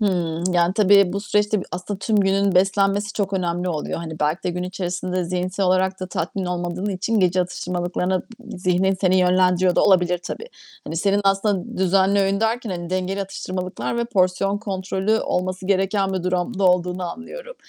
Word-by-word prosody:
Hımm. 175 Hz, -5 st, 0 dB
Yani 175 Hz, +2 st, +3 dB
tabii 200 Hz, -3 st, +5 dB
bu 200 Hz, -, -2 dB
süreçte 210 Hz, 0 st, +1 dB
b -, -, -6 dB
aslında 180 Hz, +2 st, -4 dB
tüm 215 Hz, +2 st, 0 dB
günün 195 Hz, 0 st, +2 dB
beslenmesi 195 Hz, +2 st, +2 dB
çok 200 Hz, -2 st, -2 dB
önemli 180 Hz, -1 st, -1 dB
oluyor. 155 Hz, -4 st, -3 dB
Hani 160 Hz, -2 st, -7 dB
belki 155 Hz, +5 st, 0 dB
de 180 Hz, -, -1 dB
gün 180 Hz, +1 st, -4 dB
içerisinde 180 Hz, 0 st, -3 dB
zihinsel 185 Hz, +2 st, -1 dB
olarak 185 Hz, +1 st, +1 dB
da 185 Hz, -, -3 dB
tatmin 185 Hz, +2 st, -3 dB
olmadığın 175 Hz, +1 st, -3 dB
için 195 Hz, +3 st, 0 dB
gece 185 Hz, 0 st, +3 dB
atıştırmalıklarına 180 Hz, +1 st, -2 dB
d 230 Hz, -3 st, -12 dB
zihnin 185 Hz, +1 st, +2 dB
seni 185 Hz, -1 st, +3 dB
yönlendiriyor 180 Hz, 0 st, +3 dB
da -, -, +4 dB
olabilir 180 Hz, -3 st, +3 dB
tabii. 455 Hz, -, -7 dB, 0.4 s
Hani, 160 Hz, -, -5 dB
senin 200 Hz, +4 st, +2 dB
aslında 195 Hz, -1 st, 0 dB
düzenli 190 Hz, +2 st, +3 dB
öğün 195 Hz, +1 st, +1 dB
derken, 225 Hz, -1 st, 0 dB
hani, 175 Hz, -1 st, -5 dB
dengeli 185 Hz, +1 st, -1 dB
atıştırmalıklar 185 Hz, +2 st, -4 dB
ve 235 Hz, -, 0 dB
porsiyon 195 Hz, -2 st, +1 dB
kontrolü 195 Hz, +1 st, -1 dB
olması 185 Hz, +1 st, -2 dB
gereken 195 Hz, 0 st, +1 dB
bir 185 Hz, -, -2 dB
durumda 185 Hz, +3 st, -1 dB
olduğunu 180 Hz, 0 st, +2 dB
anlıyorum. -, -, -9 dB
185 Hz, 175 wpm, -22 LUFS, 180-200 Hz, 0.4 s, tabii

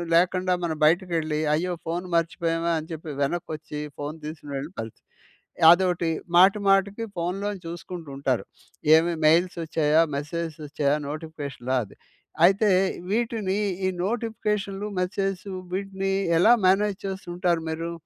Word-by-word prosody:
లేకుండా 180 Hz, +1 st, +3 dB
మనం 160 Hz, -2 st, -1 dB
బయటకెళ్ళి, 160 Hz, -2 st, +1 dB
అయ్యో! 175 Hz, +4 st, 0 dB
ఫోన్ 170 Hz, +2 st, -3 dB
మర్చిపోయామే 165 Hz, 0 st, 0 dB
అని 155 Hz, -, -9 dB
చెప్పి 160 Hz, 0 st, -7 dB
వెనకొచ్చి, 150 Hz, 0 st, -3 dB, 0.2 s
ఫోన్ 145 Hz, +2 st, -4 dB
తీసుకునేళ్ళి 145 Hz, -1 st, -6 dB
కలిసి 110 Hz, -1 st, -9 dB, 0.7 s
అదోకటి. 175 Hz, -1 st, +2 dB, 0.3 s
మాటి, 190 Hz, +4 st, +6 dB
మాటికి 195 Hz, +3 st, +2 dB
ఫోన్‌లోని 195 Hz, +4 st, -2 dB
చూసుకుంటూ 170 Hz, -1 st, -7 dB
ఉంటారు. 135 Hz, -3 st, 0 dB, 0.5 s
ఏమి 170 Hz, +2 st, +3 dB
మెయిల్స్ 175 Hz, +3 st, +3 dB
వచ్చాయా? 160 Hz, -1 st, +3 dB, 0.2 s
మెసేజస్ 160 Hz, +2 st, -4 dB
వచ్చాయా? 145 Hz, 0 st, +1 dB
నోటిఫికేషనాది. 140 Hz, -7 st, -4 dB, 0.5 s
అయితే 200 Hz, +4 st, +4 dB, 0.4 s
వీటిని 220 Hz, -3 st, 0 dB, 0.3 s
ఈ -, -, +3 dB, 0.2 s
నోటిఫికేషన్‌లు, 210 Hz, -3 st, -2 dB
మెసేజసు 195 Hz, +1 st, -2 dB, 0.2 s
వీటిని 195 Hz, 0 st, -2 dB, 0.3 s
ఎలా 220 Hz, +7 st, +7 dB
మేనేజ్ 195 Hz, +1 st, +3 dB
చేస్తూంటారు 180 Hz, -3 st, -1 dB
మీరు? 165 Hz, +1 st, -3 dB
170 Hz, 115 wpm, -25 LUFS, 155-195 Hz, 0.7 s, ఎలా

